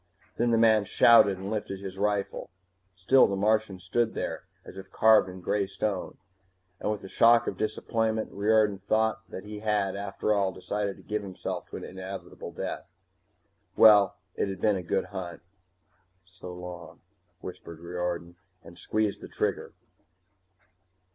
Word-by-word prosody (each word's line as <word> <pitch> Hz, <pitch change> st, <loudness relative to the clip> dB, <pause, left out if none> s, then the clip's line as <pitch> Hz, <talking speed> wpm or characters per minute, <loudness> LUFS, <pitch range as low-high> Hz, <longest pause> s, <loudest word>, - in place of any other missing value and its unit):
Then 120 Hz, +1 st, +2 dB
the 115 Hz, -, +3 dB
man 110 Hz, -2 st, +4 dB
shouted 110 Hz, -4 st, +6 dB
and 95 Hz, +2 st, -6 dB
lifted 105 Hz, -3 st, -3 dB
his 95 Hz, -1 st, -8 dB
rifle. 105 Hz, -1 st, -1 dB, 0.5 s
Still 110 Hz, +9 st, +5 dB
the 100 Hz, -, -2 dB
Martian 105 Hz, 0 st, +1 dB
stood 110 Hz, +6 st, -1 dB
there -, -, -4 dB, 0.2 s
as -, -, -11 dB
if 95 Hz, 0 st, -10 dB
carved 110 Hz, -3 st, +5 dB
in 90 Hz, 0 st, -10 dB
gray 100 Hz, +2 st, 0 dB
stone, 95 Hz, 0 st, -3 dB, 0.6 s
and 105 Hz, -, -1 dB
with 105 Hz, -, -4 dB
a -, -, -7 dB
shock 115 Hz, +4 st, +5 dB
of -, -, -3 dB
disappointment 110 Hz, +1 st, -1 dB
Riordan 105 Hz, -1 st, +2 dB
thought 110 Hz, +3 st, 0 dB
that 95 Hz, -, -7 dB
he 105 Hz, 0 st, -8 dB
had, 105 Hz, -3 st, 0 dB
after 100 Hz, +1 st, -1 dB
all, 100 Hz, -2 st, +1 dB
decided 100 Hz, +2 st, -3 dB
to -, -, -16 dB
give 105 Hz, 0 st, -2 dB
himself 95 Hz, -2 st, -6 dB
to -, -, -6 dB
an -, -, -8 dB
inevitable 95 Hz, -1 st, -8 dB
death. -, -, -5 dB, 0.9 s
Well, 105 Hz, -2 st, +7 dB, 0.2 s
it -, -, -1 dB
had 95 Hz, -1 st, -5 dB
been 105 Hz, +1 st, +2 dB
a 95 Hz, -, -3 dB
good 85 Hz, -, -1 dB
hunt. 90 Hz, -4 st, -7 dB, 0.8 s
"So 90 Hz, 0 st, -11 dB
long," 90 Hz, -2 st, -9 dB, 0.4 s
whispered 85 Hz, -2 st, -9 dB
Riordan, 85 Hz, 0 st, -4 dB, 0.3 s
and 85 Hz, +1 st, -14 dB
squeezed 110 Hz, -2 st, -1 dB
the -, -, -8 dB
trigger. -, -, -3 dB
100 Hz, 155 wpm, -28 LUFS, 95-110 Hz, 0.9 s, Well